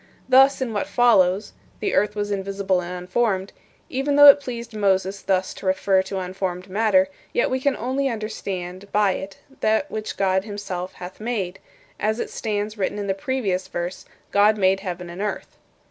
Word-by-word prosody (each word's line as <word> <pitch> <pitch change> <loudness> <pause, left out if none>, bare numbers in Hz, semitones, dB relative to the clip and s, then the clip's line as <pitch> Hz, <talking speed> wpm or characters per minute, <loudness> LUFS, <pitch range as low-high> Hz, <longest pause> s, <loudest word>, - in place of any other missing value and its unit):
Thus, 265 +1 +5
in 245 -4 -2
what 205 - -1
follows 205 -5 +3 0.3
'the 400 - -1
earth 210 0 +2
was 205 0 -2
invisible 195 -1 -1
and 175 0 -6
unformed' 190 0 0 0.3
even 275 +2 -1
though 290 0 +10
it 280 - +8
pleased 235 -4 -7
Moses 195 -2 +1
thus 185 -1 0
to - - -7
refer 190 0 +3
to 190 +1 -5
unformed 185 0 -4
matter, 195 -2 +3 0.3
yet 240 - +1
we 260 - +1
can 280 +1 +1
only 265 +3 -1
understand 200 -4 -5
by 210 -2 +3
it 195 +1 -6 0.2
that 220 +7 +1
which 215 0 -5
God 190 -1 +2
himself 195 -3 -5
hath 180 +1 -10
made, 210 -5 -3 0.4
as 220 +2 0
it - - -3
stands 210 -1 -3
written 195 +1 -1
in 205 - -3
the 195 - 0
previous 195 -4 -2
verse, 175 +2 -5 0.3
'God 210 +2 +4
made 190 -1 +3
heaven 180 -2 -5
and 175 +3 -7
earth.'" 210 - -4
200 Hz, 175 wpm, -23 LUFS, 185-225 Hz, 0.4 s, though